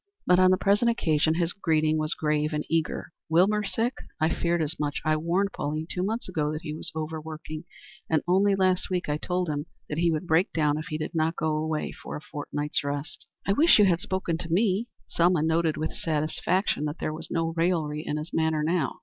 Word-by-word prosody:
But 180 Hz, 0 st, +5 dB
on 185 Hz, 0 st, +6 dB
the 185 Hz, -, +4 dB
present 205 Hz, +5 st, +3 dB
occasion 160 Hz, -8 st, +2 dB
his 170 Hz, 0 st, 0 dB
greeting 155 Hz, -4 st, +1 dB
was 155 Hz, 0 st, +1 dB
grave 150 Hz, 0 st, 0 dB
and 150 Hz, 0 st, -2 dB
eager. 160 Hz, 0 st, -1 dB, 0.2 s
"Wilbur 195 Hz, +6 st, +3 dB
sick? 225 Hz, +5 st, 0 dB, 0.3 s
I 160 Hz, +1 st, +2 dB
feared 170 Hz, 0 st, 0 dB
as 155 Hz, +2 st, -4 dB
much. 145 Hz, -1 st, -1 dB
I 155 Hz, 0 st, +3 dB
warned 175 Hz, +6 st, 0 dB
Pauline 155 Hz, +2 st, -3 dB
two 180 Hz, -, -2 dB
months 220 Hz, +5 st, -2 dB
ago 155 Hz, -5 st, -1 dB
that 155 Hz, +1 st, -5 dB
he 150 Hz, -2 st, -4 dB
was 155 Hz, -, -3 dB
overworking, 155 Hz, 0 st, -5 dB, 0.4 s
and 160 Hz, -2 st, +2 dB
only 195 Hz, +3 st, +4 dB
last 185 Hz, -1 st, +1 dB
week 180 Hz, -1 st, -1 dB
I 150 Hz, -, +1 dB
told 180 Hz, +3 st, -1 dB
him 150 Hz, 0 st, -3 dB, 0.2 s
that 150 Hz, -, -2 dB
he 170 Hz, 0 st, +3 dB
would 160 Hz, +2 st, -1 dB
break 170 Hz, +4 st, +2 dB
down 150 Hz, -2 st, +1 dB
if 155 Hz, -, -6 dB
he 155 Hz, -, -3 dB
did 155 Hz, 0 st, -4 dB
not 165 Hz, 0 st, +1 dB
go 155 Hz, -1 st, 0 dB
away 155 Hz, 0 st, -2 dB
for -, -, -8 dB
a -, -, -4 dB
fortnight's 150 Hz, -1 st, -3 dB
rest." 145 Hz, +1 st, -4 dB, 0.2 s
"I 195 Hz, -, +2 dB
wish 320 Hz, +10 st, +6 dB
you 210 Hz, -, +6 dB
had 175 Hz, -3 st, +3 dB
spoken 175 Hz, -3 st, -2 dB
to 170 Hz, -, -5 dB
me." 200 Hz, +4 st, +2 dB, 0.2 s
Selma 170 Hz, -2 st, +2 dB
noted 160 Hz, 0 st, +1 dB
with 155 Hz, -, -2 dB
satisfaction 155 Hz, +2 st, 0 dB
that 150 Hz, +2 st, -3 dB
there 155 Hz, -, -2 dB
was 165 Hz, +1 st, -7 dB
no 165 Hz, -1 st, -1 dB
raillery 165 Hz, -3 st, 0 dB
in 150 Hz, -, -2 dB
his 155 Hz, +3 st, -6 dB
manner 160 Hz, -1 st, +1 dB
now. 160 Hz, -3 st, 0 dB
160 Hz, 220 wpm, -27 LUFS, 155-180 Hz, 0.4 s, on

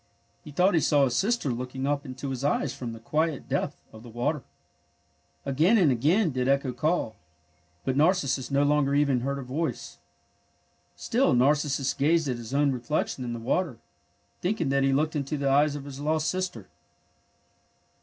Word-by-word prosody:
He -, -, -11 dB
thought 180 Hz, +7 st, +3 dB
he 165 Hz, -, +4 dB
saw 145 Hz, -2 st, +3 dB
his 125 Hz, -3 st, +1 dB
sister 215 Hz, -, +1 dB
looking 125 Hz, +2 st, -4 dB
up 145 Hz, 0 st, -1 dB
into 130 Hz, +1 st, -5 dB
his 130 Hz, 0 st, -4 dB
eyes 145 Hz, 0 st, 0 dB
from 125 Hz, -4 st, -6 dB
the 115 Hz, -, -9 dB
quiet 155 Hz, +5 st, -1 dB
depth -, -, -2 dB
of 110 Hz, -, -11 dB
the 120 Hz, -, -12 dB
water. 130 Hz, +6 st, -1 dB, 1.0 s
Again 160 Hz, -, +3 dB
and 170 Hz, -9 st, +4 dB
again 160 Hz, -, +2 dB
did 130 Hz, -1 st, -1 dB
Echo 140 Hz, -1 st, +1 dB
call, 155 Hz, -8 st, -1 dB, 0.7 s
but 130 Hz, -, 0 dB
Narcissus 145 Hz, -4 st, +2 dB
no 140 Hz, 0 st, +2 dB
longer 145 Hz, -1 st, +2 dB
even 140 Hz, -3 st, +3 dB
heard 140 Hz, +3 st, -2 dB
her 140 Hz, -, -5 dB
voice. 140 Hz, +7 st, -4 dB, 1.0 s
Still 245 Hz, -, +1 dB
Narcissus 140 Hz, +1 st, +2 dB
gazed 160 Hz, +2 st, +2 dB
at 125 Hz, -2 st, -1 dB
his 120 Hz, 0 st, -8 dB
own 140 Hz, 0 st, +2 dB
reflection 130 Hz, +1 st, -2 dB
in 120 Hz, -1 st, -4 dB
the 115 Hz, -, -5 dB
water, 130 Hz, +3 st, -1 dB, 0.6 s
thinking 180 Hz, -5 st, 0 dB
that 135 Hz, 0 st, +2 dB
he 135 Hz, 0 st, +3 dB
looked 155 Hz, +4 st, +1 dB
into 145 Hz, +1 st, -2 dB
the 140 Hz, -1 st, -1 dB
eyes 145 Hz, +1 st, +3 dB
of 140 Hz, -1 st, -7 dB
his 140 Hz, -1 st, -8 dB
lost 155 Hz, +1 st, 0 dB
sister. 185 Hz, -, -4 dB
140 Hz, 175 wpm, -27 LUFS, 130-155 Hz, 1.0 s, he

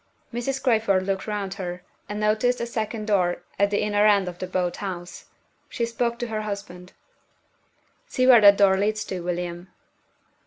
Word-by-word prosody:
Mrs. 260 Hz, +3 st, -3 dB
Crayford 215 Hz, -7 st, +2 dB
looked 195 Hz, +1 st, -2 dB
round 205 Hz, -2 st, -3 dB
her, 180 Hz, -2 st, -6 dB, 0.3 s
and 205 Hz, 0 st, -4 dB
noticed 215 Hz, +4 st, +1 dB
a 235 Hz, -, -2 dB
second 220 Hz, -2 st, -4 dB
door 180 Hz, -4 st, +1 dB, 0.2 s
at 200 Hz, 0 st, +4 dB
the 205 Hz, -, 0 dB
inner 210 Hz, 0 st, +3 dB
end 200 Hz, -3 st, +3 dB
of 175 Hz, -1 st, -7 dB
the 185 Hz, -, -4 dB
boat 180 Hz, -1 st, -1 dB
house. 180 Hz, -3 st, -6 dB, 0.4 s
She 235 Hz, -, -2 dB
spoke 235 Hz, 0 st, -2 dB
to 240 Hz, -, -4 dB
her 215 Hz, -1 st, -2 dB
husband. 200 Hz, -4 st, -7 dB, 1.1 s
"See 255 Hz, -, 0 dB
where 250 Hz, -3 st, +8 dB
that 200 Hz, -1 st, +8 dB
door 195 Hz, -2 st, +5 dB
leads 215 Hz, +1 st, 0 dB
to, 185 Hz, -, -4 dB
William." 175 Hz, 0 st, -4 dB
205 Hz, 170 wpm, -24 LUFS, 185-220 Hz, 1.1 s, where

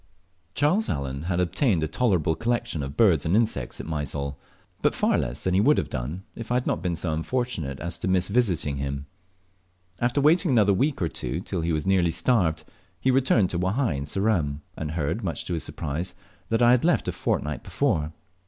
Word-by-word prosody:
Charles 180 Hz, +10 st, +2 dB
Allen 70 Hz, -1 st, -3 dB
had 90 Hz, -1 st, +1 dB
obtained 90 Hz, -, +2 dB
a -, -, 0 dB
tolerable 85 Hz, -3 st, +1 dB
collection 115 Hz, -5 st, -1 dB
of 70 Hz, +1 st, -6 dB
birds 90 Hz, -10 st, +4 dB
and 85 Hz, +4 st, +1 dB
insects 110 Hz, -, 0 dB
at -, -, -6 dB
Mysol, 70 Hz, -2 st, -3 dB, 0.5 s
but -, -, +2 dB
far -, -, +2 dB
less 60 Hz, 0 st, -2 dB
than 95 Hz, -, +1 dB
he 95 Hz, -, +4 dB
would 150 Hz, +7 st, +4 dB
have -, -, -1 dB
done 70 Hz, +9 st, -4 dB
if 115 Hz, -, -7 dB
I -, -, +2 dB
had 125 Hz, -, +1 dB
not -, -, -1 dB
been 90 Hz, -1 st, -1 dB
so 80 Hz, -1 st, -2 dB
unfortunate 80 Hz, -, -2 dB
as 85 Hz, +1 st, -4 dB
to -, -, -3 dB
miss 90 Hz, -1 st, +2 dB
visiting 95 Hz, -, +1 dB
him. 70 Hz, 0 st, -3 dB, 0.9 s
After 120 Hz, +3 st, +1 dB
waiting 165 Hz, +5 st, +4 dB
another 105 Hz, -6 st, +4 dB
week 135 Hz, -, 0 dB
or -, -, +2 dB
two 65 Hz, 0 st, -4 dB
till 95 Hz, -1 st, -3 dB
he 85 Hz, +1 st, -1 dB
was 75 Hz, -2 st, -1 dB
nearly 95 Hz, -3 st, +3 dB
starved, 80 Hz, -4 st, +1 dB, 0.4 s
he 130 Hz, -, +2 dB
returned 125 Hz, -7 st, +3 dB
to 85 Hz, -, -1 dB
Wahai 100 Hz, -, +1 dB
in 70 Hz, +1 st, -3 dB
Ceram, 80 Hz, -6 st, 0 dB
and 75 Hz, -1 st, -4 dB
heard, 80 Hz, +7 st, -2 dB
much 85 Hz, -4 st, -2 dB
to 90 Hz, -, -3 dB
his 80 Hz, -, -2 dB
surprise, 85 Hz, +4 st, -3 dB, 0.3 s
that 115 Hz, +1 st, +2 dB
I 120 Hz, -, +7 dB
had 125 Hz, -1 st, +4 dB
left 175 Hz, 0 st, +2 dB
a -, -, +1 dB
fortnight 75 Hz, -3 st, -2 dB
before. 75 Hz, -1 st, 0 dB
90 Hz, 205 wpm, -25 LUFS, 75-115 Hz, 0.9 s, I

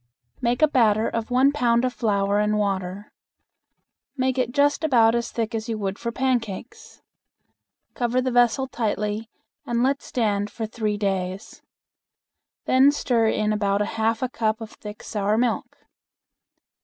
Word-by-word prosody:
Make 245 Hz, +3 st, +1 dB
a -, -, +8 dB
batter 225 Hz, -6 st, +3 dB
of 230 Hz, -1 st, -3 dB
one 260 Hz, +3 st, +4 dB
pound 245 Hz, -4 st, +2 dB
of 250 Hz, -, -1 dB
flour 200 Hz, -2 st, +1 dB
and 210 Hz, 0 st, +1 dB
water. 195 Hz, -1 st, -2 dB, 1.1 s
Make 260 Hz, 0 st, 0 dB
it 245 Hz, -1 st, 0 dB
just 285 Hz, +4 st, +2 dB
about 235 Hz, -7 st, +4 dB
as 235 Hz, 0 st, -1 dB
thick 230 Hz, 0 st, -3 dB
as 225 Hz, +1 st, -4 dB
you 225 Hz, -, -2 dB
would 200 Hz, -1 st, -3 dB
for 235 Hz, -, -3 dB
pancakes. 240 Hz, -6 st, -3 dB, 0.9 s
Cover 245 Hz, +1 st, 0 dB
the 255 Hz, 0 st, 0 dB
vessel 245 Hz, +1 st, +3 dB
tightly 215 Hz, -2 st, -2 dB, 0.3 s
and 235 Hz, 0 st, 0 dB
let 275 Hz, +2 st, +1 dB
stand 205 Hz, -4 st, -1 dB
for 220 Hz, +2 st, -5 dB
three 215 Hz, -2 st, -2 dB
days. 190 Hz, -1 st, -3 dB, 1.0 s
Then 265 Hz, +2 st, +5 dB
stir 240 Hz, -6 st, +1 dB
in 215 Hz, -1 st, +1 dB
about 205 Hz, -1 st, +1 dB
a -, -, -5 dB
half 225 Hz, +1 st, 0 dB
a 255 Hz, -, 0 dB
cup 220 Hz, -2 st, -1 dB
of 225 Hz, -1 st, -8 dB
thick 210 Hz, 0 st, -10 dB
sour 210 Hz, 0 st, -1 dB
milk. 240 Hz, 0 st, -1 dB
225 Hz, 155 wpm, -24 LUFS, 210-245 Hz, 1.1 s, a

